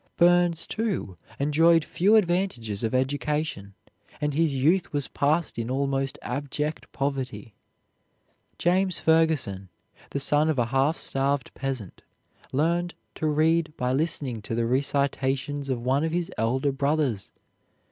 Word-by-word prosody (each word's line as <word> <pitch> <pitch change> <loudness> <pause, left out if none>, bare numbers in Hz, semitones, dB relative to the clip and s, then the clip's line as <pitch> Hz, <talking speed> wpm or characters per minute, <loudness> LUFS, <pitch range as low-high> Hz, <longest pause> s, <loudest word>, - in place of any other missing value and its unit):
Burns, 175 -1 +4
too, 210 - -3 0.2
enjoyed 160 +3 +4
few 200 +5 +3
advantages 175 - 0
of 115 +2 0
education, 140 -6 -2 0.4
and 150 -1 -1
his 155 -1 +1
youth 165 +8 +2
was 145 -2 -1
passed 155 -2 0
in 115 +1 -3
almost 135 0 -1
abject 145 +4 -4
poverty. 130 -6 -3 1.0
James 185 +1 +3
Ferguson, 155 - +1 0.4
the 140 - -3
son 150 +2 +3
of 155 - 0
a 120 - +2
half 140 +5 +2
starved 135 -1 0
peasant, 130 -8 -5 0.5
learned 170 +5 0 0.2
to 155 - -2
read 155 +1 +2
by 125 0 0
listening 140 -6 -1
to 115 - -4
the 115 0 0
recitations 140 +2 -1
of 120 -2 -2
one 135 +3 +2
of 160 - -1
his 175 -1 -1
elder 130 +6 0
brothers. 140 -6 -1
145 Hz, 130 wpm, -26 LUFS, 130-160 Hz, 1.0 s, Burns